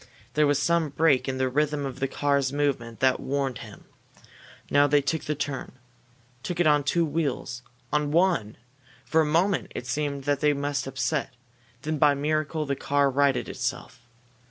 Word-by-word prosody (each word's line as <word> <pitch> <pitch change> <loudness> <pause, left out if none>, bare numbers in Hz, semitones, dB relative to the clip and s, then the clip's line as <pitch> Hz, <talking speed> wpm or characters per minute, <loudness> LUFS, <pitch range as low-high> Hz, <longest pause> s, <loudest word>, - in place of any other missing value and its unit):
There 150 +1 +3
was 145 -1 +3
some 170 0 +1
break 145 -2 +2
in 130 - -2
the 130 0 +1
rhythm 145 +2 0
of 135 - -6
the 135 - 0
car's 140 -1 0
movement 135 -6 -2
that 130 -1 +3
warned 135 -3 -2
him. - - -11 0.9
Now 145 0 +5
they 145 +1 +4
took 145 +3 -2
the 150 - -1
turn. 145 -2 -4 0.7
Took 175 +5 -4
it 175 - +3
on 150 -1 +4
two 170 +4 +1
wheels 145 -5 -2 0.3
on 150 -1 +1
one! 160 - +1 0.5
For 160 - +3
a - - +2
moment 175 +5 +1
it - - -5
seemed 140 +2 -2
that 145 0 0
they 150 0 +3
must 145 0 -2
upset. 135 0 -2 0.5
Then, 155 0 -2
by 145 -1 +5
a - - -3
miracle, 155 +2 -1
the 140 -1 -1
car 140 0 +1
righted 140 -1 +2
itself. 125 0 -4
145 Hz, 180 wpm, -26 LUFS, 135-150 Hz, 0.9 s, Now